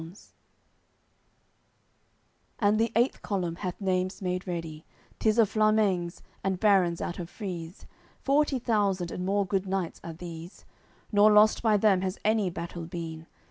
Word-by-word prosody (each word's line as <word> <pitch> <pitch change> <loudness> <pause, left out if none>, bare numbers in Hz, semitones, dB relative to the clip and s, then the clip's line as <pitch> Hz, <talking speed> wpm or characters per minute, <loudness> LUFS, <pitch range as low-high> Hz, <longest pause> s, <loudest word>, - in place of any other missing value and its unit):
CCXXIII 165 +5 -12 2.3
And 210 0 +2
the 225 0 +1
eighth 240 +3 +2
column 180 -5 -2
hath 180 -2 -5
Naimes 185 -1 -1
made 180 0 -3
ready; 165 -3 -5 0.4
Tis 220 0 +2
of 225 -4 +5
Flamengs, 215 -5 +1 0.2
and 190 -1 -1
barons 190 -5 +3
out 175 - -4
of 170 -1 -6
Frise; 180 -4 -7 0.3
Forty 280 0 +2
thousand 200 -7 0
and 180 - -4
more 200 +2 +1
good 190 +1 -1
knights 190 -3 -3
are 165 - -6
these, 170 +1 -10 0.5
Nor 210 0 +6
lost 210 +1 +5
by 220 -2 +3
them 195 -3 +3
has 190 0 -2
any 215 -3 +2
battle 170 -1 -6
been. 165 -1 -7
190 Hz, 145 wpm, -28 LUFS, 175-210 Hz, 2.3 s, Nor